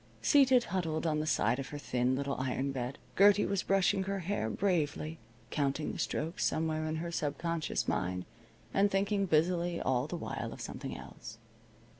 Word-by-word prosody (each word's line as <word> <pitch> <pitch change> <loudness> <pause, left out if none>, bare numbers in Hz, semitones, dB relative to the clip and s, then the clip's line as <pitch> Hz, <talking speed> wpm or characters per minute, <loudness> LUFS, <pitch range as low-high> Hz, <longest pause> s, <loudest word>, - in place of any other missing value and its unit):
Seated 265 -4 +5
huddled 165 -4 -1
on 155 -2 +1
the 155 - -2
side 125 - +2
of 135 - -4
her 145 - -6
thin 125 -2 0
little 140 +1 -1
iron 130 +1 -1
bed, 130 0 -4 0.2
Gertie 205 +1 +6
was 200 -2 0
brushing 195 0 +2
her 195 0 -2
hair 175 - -1
bravely, 160 - -1 0.3
counting 145 +1 0
the - - -7
strokes 160 +3 -2
somewhere 155 0 0
in 155 - -2
her 170 +2 -3
sub 145 -3 -2
conscious 165 -2 -1
mind 90 0 -1 0.5
and 200 +1 +4
thinking 195 0 +1
busily 170 +2 +2
all 125 -1 +1
the - - -4
while - - -4
of - - -11
something - - -5
else. - - -10
160 Hz, 175 wpm, -32 LUFS, 140-190 Hz, 0.5 s, Gertie